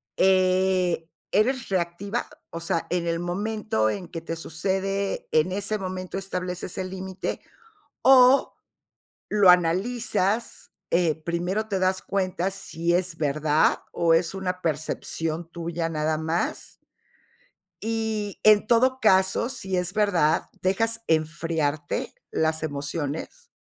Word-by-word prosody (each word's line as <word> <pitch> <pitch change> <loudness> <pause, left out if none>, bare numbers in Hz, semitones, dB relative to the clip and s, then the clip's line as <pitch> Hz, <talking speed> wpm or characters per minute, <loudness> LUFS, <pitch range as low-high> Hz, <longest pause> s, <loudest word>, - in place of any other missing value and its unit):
eh, 185 -2 +2 0.2
¿eres 240 +4 +2
reactiva? 190 +4 -2 0.2
O 170 - -6
sea, 165 0 -1
en 175 -1 -1
el 165 0 0
momento 190 - -1
en 180 - -4
que 165 - -7
te 165 0 -5
sucede, 195 +4 -2
¿en 155 +3 +3
ese 205 +3 0
momento 185 0 -5
estableces 180 -1 -4
el 185 -1 -3
límite? 190 0 -5 0.6
O 260 0 +6 0.7
lo 205 -3 +6
analizas, 195 +4 +1 0.2
eh, 170 -3 +3
¿primero 175 +5 -1
te 195 -3 -2
das 185 0 +1
cuenta 190 -1 -1
si 170 -3 -2
es 180 -2 +1
verdad 150 +1 +2
o 165 -1 +2
es 165 +2 +1
una 185 -1 -3
percepción 160 +1 -2
tuya 170 -1 -3
nada 155 -1 -1
más? 160 +2 -3 1.0
Y 220 -2 -3
en 215 0 +6
todo 255 +3 +3
caso, 190 +1 +3
si 195 -8 -3
es 180 +1 -1
verdad, 180 -7 +2
¿dejas 225 +5 +1
enfriarte 155 -2 -1 0.2
las 160 0 0
emociones 155 - -4
185 Hz, 120 wpm, -25 LUFS, 165-200 Hz, 1.0 s, O